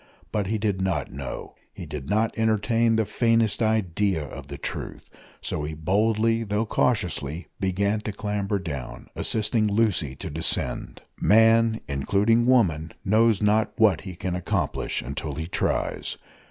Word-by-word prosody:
But 105 Hz, -3 st, -1 dB
he 110 Hz, +2 st, 0 dB
did 100 Hz, -3 st, -1 dB
not 90 Hz, -7 st, -1 dB
know 65 Hz, -2 st, -6 dB, 0.2 s
he -, -, -7 dB
did 70 Hz, 0 st, -7 dB
not 110 Hz, +2 st, +1 dB
entertain 110 Hz, +1 st, +2 dB
the 110 Hz, -1 st, +2 dB
faintest 115 Hz, +1 st, +2 dB
idea 100 Hz, -5 st, +1 dB
of 70 Hz, 0 st, -9 dB
the 70 Hz, 0 st, -7 dB
truth -, -, -6 dB, 0.4 s
so 75 Hz, -, -2 dB
he 75 Hz, +1 st, -4 dB
boldly, 110 Hz, +7 st, +1 dB
though 105 Hz, +1 st, -1 dB
cautiously, 90 Hz, -, -1 dB
began 100 Hz, +2 st, 0 dB
to 105 Hz, -, -4 dB
clamber 105 Hz, 0 st, -2 dB
down, 75 Hz, -9 st, -6 dB
assisting 110 Hz, 0 st, +1 dB
Lucy 100 Hz, -10 st, +1 dB
to -, -, -7 dB
descend. 80 Hz, +2 st, -1 dB, 0.2 s
Man, 115 Hz, +1 st, +4 dB
(including 100 Hz, -, +2 dB
woman), 85 Hz, -, +2 dB
knows 110 Hz, +1 st, +3 dB
not 105 Hz, +1 st, +2 dB
what 105 Hz, -8 st, +4 dB
he 95 Hz, -3 st, -8 dB
can 90 Hz, +1 st, -3 dB
accomplish 90 Hz, -, -2 dB
until 70 Hz, +2 st, -5 dB
he 80 Hz, +2 st, -4 dB
tries. 85 Hz, -, -1 dB
105 Hz, 145 wpm, -25 LUFS, 80-110 Hz, 0.4 s, Man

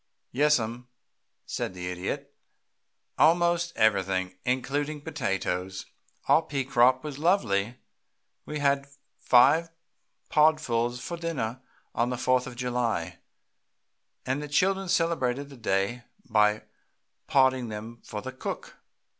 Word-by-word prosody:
"Yes, 150 Hz, +4 st, +4 dB
ma'am," 120 Hz, +2 st, -5 dB, 0.6 s
said 95 Hz, -, -4 dB
the 90 Hz, 0 st, -5 dB
Idiot, 90 Hz, +1 st, -5 dB, 0.9 s
"almost 170 Hz, +1 st, +3 dB
everything, 95 Hz, -3 st, +1 dB
including 145 Hz, +4 st, -1 dB
potatoes. 95 Hz, -, -3 dB, 0.4 s
Our -, -, +5 dB
pea 145 Hz, -4 st, -3 dB
crop 130 Hz, +1 st, +4 dB
was 145 Hz, -2 st, -6 dB
lovely. 120 Hz, -, +1 dB, 0.7 s
We 150 Hz, -, -5 dB
had 140 Hz, -1 st, +1 dB, 0.3 s
five 140 Hz, +7 st, +5 dB, 0.6 s
podfuls 125 Hz, -6 st, +2 dB
for 170 Hz, -, -5 dB
dinner 130 Hz, -8 st, -3 dB, 0.3 s
on 120 Hz, +1 st, +1 dB
the 125 Hz, -, -2 dB
Fourth 125 Hz, +1 st, +1 dB
of 125 Hz, -, -8 dB
July, 120 Hz, -8 st, -2 dB, 1.1 s
and 130 Hz, +3 st, -1 dB
the 150 Hz, -, -5 dB
children 190 Hz, +5 st, +1 dB
celebrated 145 Hz, -6 st, 0 dB
the 140 Hz, -, -12 dB
day 110 Hz, +2 st, -1 dB, 0.2 s
by 105 Hz, -2 st, +3 dB, 0.7 s
podding 130 Hz, -3 st, +3 dB
them 110 Hz, +2 st, -8 dB
for 105 Hz, -2 st, -6 dB
the 130 Hz, -, -5 dB
cook. 130 Hz, -, -6 dB
125 Hz, 115 wpm, -27 LUFS, 110-150 Hz, 1.1 s, Our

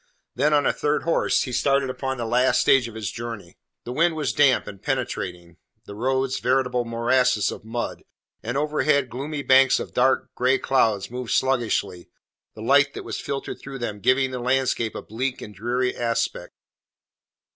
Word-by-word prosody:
Then 145 Hz, +4 st, +1 dB
on 145 Hz, -1 st, +3 dB
a -, -, +2 dB
third 150 Hz, 0 st, -1 dB
horse 170 Hz, -, +1 dB
he 130 Hz, -, -5 dB
started 135 Hz, +2 st, +1 dB
upon 130 Hz, 0 st, -4 dB
the 120 Hz, -, -3 dB
last 125 Hz, +3 st, +2 dB
stage 130 Hz, -3 st, +4 dB
of 115 Hz, -, -11 dB
his 110 Hz, -3 st, -4 dB
journey. 115 Hz, -7 st, -8 dB, 0.2 s
The 120 Hz, -, -6 dB
wind 165 Hz, +5 st, +2 dB
was 155 Hz, -2 st, -1 dB
damp 140 Hz, -3 st, +4 dB
and 100 Hz, -2 st, -10 dB
penetrating; 95 Hz, -, -4 dB, 0.3 s
the -, -, -9 dB
roads 130 Hz, +4 st, -1 dB
veritable 125 Hz, -1 st, +1 dB
morasses 115 Hz, -1 st, +1 dB
of -, -, -9 dB
mud, 115 Hz, +2 st, -4 dB, 0.4 s
and 120 Hz, +4 st, -3 dB
overhead 150 Hz, -2 st, +1 dB
gloomy 140 Hz, +3 st, -4 dB
banks 135 Hz, 0 st, +5 dB
of -, -, -7 dB
dark, 130 Hz, +2 st, +1 dB
grey 130 Hz, +2 st, +2 dB
clouds 110 Hz, -6 st, +1 dB
moved 125 Hz, -1 st, -5 dB
sluggishly, 120 Hz, -9 st, 0 dB, 0.5 s
the 110 Hz, -, -8 dB
light 140 Hz, +3 st, +4 dB
that -, -, -6 dB
was -, -, -5 dB
filtered 140 Hz, -1 st, -5 dB
through 135 Hz, 0 st, -7 dB
them 105 Hz, -5 st, -4 dB
giving 130 Hz, +5 st, +2 dB
the 125 Hz, -, -4 dB
landscape 125 Hz, -2 st, 0 dB
a -, -, -6 dB
bleak 125 Hz, +4 st, -3 dB
and 105 Hz, -, -9 dB
dreary 125 Hz, +5 st, -1 dB
aspect. 115 Hz, -1 st, -2 dB
125 Hz, 175 wpm, -24 LUFS, 115-135 Hz, 0.5 s, banks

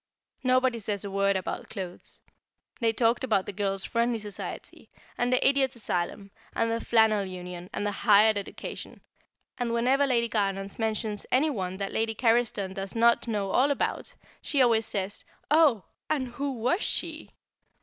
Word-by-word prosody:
Nobody 255 Hz, -2 st, +2 dB
says 205 Hz, -1 st, -3 dB
a 200 Hz, -, -5 dB
word 200 Hz, 0 st, +2 dB
about 185 Hz, -, -4 dB
clothes; 185 Hz, -4 st, -6 dB, 0.6 s
they 230 Hz, -3 st, +2 dB
talked 230 Hz, +2 st, +1 dB
about 215 Hz, -7 st, +1 dB
the -, -, -6 dB
Girls' 195 Hz, -1 st, -1 dB
Friendly 235 Hz, 0 st, 0 dB
Society, 210 Hz, -3 st, -7 dB, 0.3 s
and 245 Hz, +1 st, 0 dB
the 255 Hz, -, +3 dB
Idiot 270 Hz, -2 st, +2 dB
Asylum, 195 Hz, -2 st, -3 dB, 0.2 s
and 230 Hz, 0 st, +1 dB
the 230 Hz, 0 st, -1 dB
Flannel 220 Hz, -3 st, +4 dB
Union, 180 Hz, -1 st, -7 dB
and 205 Hz, -, -2 dB
Higher 210 Hz, +1 st, +5 dB
Education, 200 Hz, -1 st, -7 dB, 0.6 s
and 240 Hz, -1 st, -1 dB
whenever 260 Hz, +4 st, +3 dB
Lady 235 Hz, -3 st, +2 dB
Garnons 195 Hz, -2 st, -2 dB
mentions 215 Hz, -1 st, -1 dB
any 295 Hz, +5 st, +3 dB
one 190 Hz, -6 st, -3 dB
that 195 Hz, 0 st, -3 dB
Lady 225 Hz, 0 st, 0 dB
Carriston 225 Hz, -5 st, +1 dB
does 195 Hz, +2 st, -3 dB
not 235 Hz, +1 st, +4 dB
know 205 Hz, -4 st, -1 dB
all 265 Hz, +7 st, +4 dB
about, 285 Hz, -, -1 dB, 0.3 s
she 285 Hz, -, -1 dB
always 230 Hz, -3 st, +4 dB
says, 200 Hz, -1 st, -2 dB, 0.3 s
"Oh! 295 Hz, -, +5 dB, 0.3 s
and 265 Hz, -5 st, 0 dB
who 275 Hz, +3 st, -3 dB
was 255 Hz, -, 0 dB
she?" 320 Hz, -2 st, -2 dB
225 Hz, 160 wpm, -28 LUFS, 200-245 Hz, 0.6 s, Higher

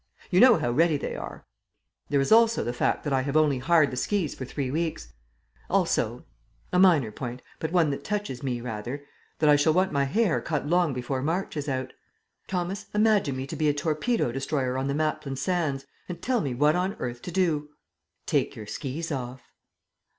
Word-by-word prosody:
You 180 Hz, -, +4 dB
know 245 Hz, -2 st, +8 dB
how 120 Hz, -, -1 dB
ready 160 Hz, +4 st, +3 dB
they -, -, -4 dB
are. -, -, -8 dB, 0.6 s
There 140 Hz, -, +2 dB
is 135 Hz, -, 0 dB
also 230 Hz, 0 st, +5 dB
the 120 Hz, -, -2 dB
fact -, -, 0 dB
that 145 Hz, -, -1 dB
I 130 Hz, -, +3 dB
have 140 Hz, +3 st, 0 dB
only 150 Hz, -4 st, +3 dB
hired 160 Hz, +2 st, +3 dB
the -, -, -4 dB
skis 190 Hz, 0 st, 0 dB
for 130 Hz, -, -6 dB
three 130 Hz, 0 st, -3 dB
weeks. 160 Hz, +2 st, -3 dB, 0.6 s
Also -, -, 0 dB, 0.5 s
a 180 Hz, -, +4 dB
minor 160 Hz, -, +5 dB
point, 125 Hz, +2 st, -6 dB, 0.2 s
but 160 Hz, -, -3 dB
one 170 Hz, -5 st, +3 dB
that 140 Hz, -, -5 dB
touches 205 Hz, -12 st, -3 dB
me 125 Hz, -3 st, -2 dB
rather 120 Hz, +4 st, -5 dB, 0.3 s
that 155 Hz, -, +2 dB
I 150 Hz, -, +7 dB
shall 145 Hz, +2 st, +3 dB
want 185 Hz, +3 st, +2 dB
my 140 Hz, -1 st, +1 dB
hair 205 Hz, +5 st, +1 dB
cut 150 Hz, -4 st, -2 dB
long 175 Hz, 0 st, +2 dB
before 130 Hz, +1 st, -2 dB
March 165 Hz, +7 st, -2 dB
is 150 Hz, -1 st, -3 dB
out. 130 Hz, -1 st, -3 dB, 0.5 s
Thomas, 190 Hz, +2 st, -3 dB
imagine 210 Hz, -10 st, +3 dB
me 130 Hz, -, -3 dB
to 135 Hz, -, -6 dB
be 155 Hz, -1 st, +2 dB
a 145 Hz, -, +1 dB
torpedo 155 Hz, -, 0 dB
destroyer 135 Hz, 0 st, -1 dB
on 130 Hz, +1 st, -1 dB
the 140 Hz, -, -1 dB
Maplin 155 Hz, -2 st, -1 dB
Sands, 140 Hz, -2 st, -1 dB, 0.2 s
and 175 Hz, -, -5 dB
tell 250 Hz, -2 st, 0 dB
me 135 Hz, -5 st, -2 dB
what 150 Hz, +5 st, +3 dB
on 185 Hz, +2 st, 0 dB
earth 120 Hz, -1 st, -5 dB
to 180 Hz, -, -6 dB
do." 160 Hz, -5 st, 0 dB, 0.6 s
"Take -, -, 0 dB
your 110 Hz, -, -8 dB
skis 150 Hz, +9 st, -5 dB
off." 130 Hz, -2 st, -6 dB
150 Hz, 200 wpm, -26 LUFS, 130-175 Hz, 0.6 s, know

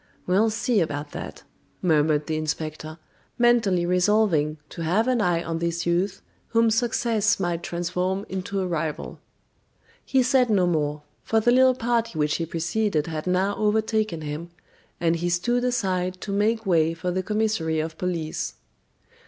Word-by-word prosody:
"We'll 200 Hz, +5 st, +3 dB
see 225 Hz, +1 st, +1 dB
about 145 Hz, -2 st, -3 dB
that," -, -, -7 dB, 0.4 s
murmured 155 Hz, -3 st, +2 dB
the 160 Hz, -, -2 dB
inspector, 155 Hz, 0 st, -4 dB, 0.4 s
mentally 225 Hz, -7 st, +3 dB
resolving 180 Hz, -4 st, +2 dB
to -, -, -8 dB
have 185 Hz, +9 st, +1 dB
an 250 Hz, -3 st, +2 dB
eye 175 Hz, -3 st, +1 dB
on 165 Hz, 0 st, -3 dB
this 170 Hz, 0 st, -2 dB
youth 175 Hz, +3 st, 0 dB, 0.2 s
whom 230 Hz, -1 st, +3 dB
success 225 Hz, -1 st, +1 dB
might 175 Hz, -2 st, -1 dB
transform 180 Hz, +3 st, -2 dB
into 190 Hz, +1 st, -3 dB
a -, -, -1 dB
rival. 160 Hz, -3 st, -3 dB, 0.8 s
He 265 Hz, -1 st, +2 dB
said 250 Hz, -1 st, +3 dB
no 195 Hz, -4 st, +3 dB
more, 150 Hz, -3 st, -1 dB, 0.2 s
for 225 Hz, -, +2 dB
the 240 Hz, +2 st, +3 dB
little 255 Hz, +1 st, +5 dB
party 230 Hz, -5 st, -1 dB
which 150 Hz, 0 st, +1 dB
he 165 Hz, -, -3 dB
preceded 170 Hz, 0 st, 0 dB
had 160 Hz, 0 st, -5 dB
now 190 Hz, +3 st, +1 dB
overtaken 215 Hz, -4 st, 0 dB
him, 155 Hz, +3 st, -5 dB, 0.5 s
and 170 Hz, 0 st, +2 dB
he 175 Hz, +1 st, -1 dB
stood 240 Hz, +8 st, +1 dB
aside 185 Hz, -7 st, -1 dB
to 205 Hz, -, -5 dB
make 220 Hz, +3 st, +1 dB
way 165 Hz, -3 st, +2 dB
for 180 Hz, +2 st, -3 dB
the 185 Hz, +1 st, -1 dB
commissary 210 Hz, -6 st, 0 dB
of 160 Hz, +1 st, -4 dB
police. 170 Hz, -4 st, -3 dB
180 Hz, 155 wpm, -24 LUFS, 165-220 Hz, 0.8 s, little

